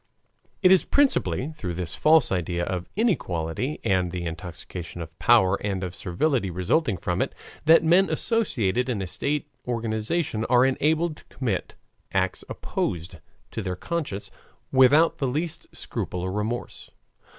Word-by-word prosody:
It 185 - +7
is 190 - +6
principally 265 - +1
through 95 - -5
this 85 -3 -4
false 155 -3 +4
idea 85 -1 -1
of 90 -1 -4
inequality, 130 - -1
and 90 -2 +2
the 90 0 -4
intoxication 85 +1 -7
of 80 -1 -8
power 100 -5 +4
and 95 -2 -2
of 90 -1 -4
servility 100 - 0
resulting 95 - +1
from - - -1
it, - - -2 0.3
that 160 +1 +7
men 180 +4 +4
associated 125 - 0
in 115 -5 -1
a 95 - -2
state 140 +11 -2 0.2
organization 115 +2 -1
are 125 +1 +5
enabled 155 +4 +1
to - - -17
commit 110 -8 -3 0.4
acts 95 -1 0
opposed 85 +1 -3 0.3
to 110 - -4
their 95 -3 -3
conscience 140 - -4 0.4
without 135 +5 +5
the 135 - 0
least 150 +6 -3
scruple 90 - -4
or 95 +1 -2
remorse. 105 +4 -4
110 Hz, 145 wpm, -25 LUFS, 90-150 Hz, 0.4 s, It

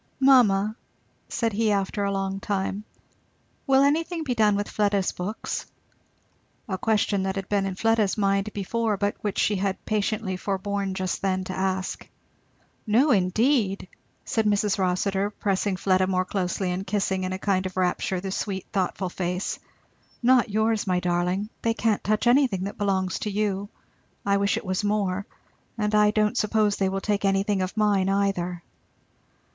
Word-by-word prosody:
"Mamma," 220 -6 +4 0.5
said 230 -5 -1
he 220 +1 +1
after 200 0 0
a 200 - 0
long 195 0 -2
time, 195 +1 -2 0.8
"will 270 0 +5
anything 325 +4 +1
be 265 -5 -1
done 215 -3 +3
with 205 0 -1
Fleda's 200 -2 +1
books?" 200 +5 -4 1.0
A 190 - -2
question 205 0 +1
that 190 0 -2
had 195 -1 -4
been 200 -1 +1
in 190 - -4
Fleda's 225 -1 +2
mind 200 0 +1
before, 215 +2 -1
but 205 +1 0
which 205 -2 -3
she 205 - +2
had 195 0 -2
patiently 210 -2 -1
forborne 195 0 -2
just 185 -1 -2
then 190 -1 0
to 185 - -5
ask. 190 -1 -2 0.8
"No 250 +8 +4
indeed!" 200 0 +2 0.4
said 220 -2 0
Mrs. 205 0 +1
Rossitur, 190 +2 0
pressing 200 -1 -1
Fleda 185 0 +2
more 185 -1 +1
closely 185 -1 -1
and 190 +2 -4
kissing 190 -2 0
in 185 - -2
a 185 - -2
kind 190 -1 0
of 185 - -10
rapture 185 0 0
the 190 +1 -5
sweet 190 -1 -3
thoughtful 190 -1 -1
face; 180 +1 -3 0.6
"not 250 -1 +4
yours, 220 0 +1
my 180 -1 +2
darling; 180 +3 0
they 230 0 +1
can't 220 -3 0
touch 215 +2 0
anything 240 -6 +3
that 200 - -6
belongs 190 -2 0
to 210 - -3
you 205 -1 -1 0.6
I 200 0 +3
wish 200 0 +1
it - - -5
was 185 +1 -1
more 200 -2 0 0.5
and 210 -1 -1
I 210 0 +5
don't 215 +2 +1
suppose 210 -1 +2
they 190 -1 +1
will 195 0 -2
take 205 -1 -1
anything 195 0 +1
of 185 +4 -3
mine 200 -3 +2
either." 180 -3 0
200 Hz, 165 wpm, -25 LUFS, 190-215 Hz, 1.0 s, will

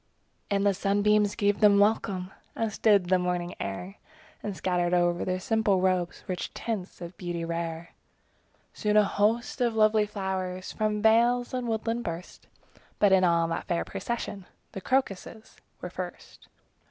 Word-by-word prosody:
And 200 0 +1
the 200 - +4
sunbeams 205 +1 +2
gave 205 -2 +1
them 205 -2 +6
welcome. 200 -3 +1 0.2
As 225 -2 -3
did 200 -5 +4
the 185 -1 +4
morning 180 0 -2
air 180 - -5 0.4
And 205 -2 -5
scattered 180 -1 +1
o'er 175 0 +2
their 185 0 -1
simple 210 -1 +1
robes 185 -2 0
Rich 180 -2 -5
tints 210 -7 -5
of 170 +1 -8
beauty 175 -2 -4
rare. 165 0 -4 0.8
Soon 210 0 +1
a 210 - +7
host 215 +5 0
of 235 -2 +1
lovely 215 -1 +4
flowers 190 -2 -4
From 215 0 -1
vales 240 +3 +3
and 250 -1 -2
woodland 230 +1 -1
burst; 170 -1 -7 0.5
But 205 - +4
in 190 -1 +5
all 170 -1 +3
that 165 - -3
fair 170 - -1
procession 205 -5 -5 0.2
The 195 - -7
crocuses 220 -3 -2 0.2
were - - -6
first. - - -8
200 Hz, 155 wpm, -27 LUFS, 180-215 Hz, 0.8 s, a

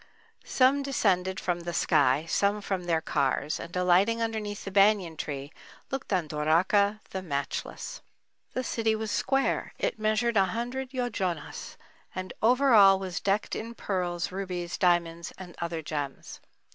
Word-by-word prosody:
Some 265 +2 +4
descended 190 -9 +1
from 175 -1 -1
the 170 0 -5
sky, 145 -1 +3
some 200 +4 +1
from 190 -3 -3
their 165 -2 +1
cars—and 150 +4 -1
alighting 180 +5 +3
underneath 220 -3 -3
the 195 - -5
banyan 195 -4 +4
tree, 140 -1 -5 0.4
looked 270 -4 -4
on 180 -5 +1
Dwáraká, 180 +8 +2
the 190 - -3
matchless. 155 - -4 0.5
The 255 - -2
city 225 -2 0
was 220 -1 -3
square,—it 270 -4 0
measured 215 +2 +1
a 195 - +5
hundred 245 +7 -3
yojonas, 205 - -3 0.4
and 185 0 -5
over 250 +3 +4
all, 195 -3 +8
was 190 -1 -4
decked 200 +1 0
in 230 +2 -6
pearls, 180 -5 -2
rubies, 180 -3 -4
diamonds, 170 -1 +1
and 180 -2 -10
other 170 -1 -3
gems. 145 -2 -5
190 Hz, 140 wpm, -28 LUFS, 170-220 Hz, 0.5 s, all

